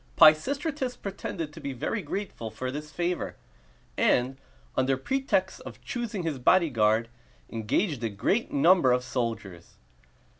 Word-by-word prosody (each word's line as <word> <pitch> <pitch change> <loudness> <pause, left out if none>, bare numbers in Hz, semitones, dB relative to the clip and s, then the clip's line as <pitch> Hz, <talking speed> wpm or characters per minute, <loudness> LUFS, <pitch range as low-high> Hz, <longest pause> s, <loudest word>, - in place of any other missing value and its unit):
Pisistratus 260 - +4
pretended 175 -5 -5
to 160 - -10
be 140 -1 -4
very 130 - -2
grateful 195 - -5
for 125 +4 -4
this 150 +2 -6
favor, 175 +4 -2 0.6
and, 125 - +2 0.4
under 130 +1 +2
pretext 270 - 0
of - - -10
choosing 230 -6 -4
his 155 -5 -2
bodyguard, 115 -8 +3 0.4
engaged 120 - -1
a 115 - 0
great 190 - 0
number 185 - +5
of 125 0 +2
soldiers. 115 -9 -4
150 Hz, 125 wpm, -28 LUFS, 125-200 Hz, 0.6 s, number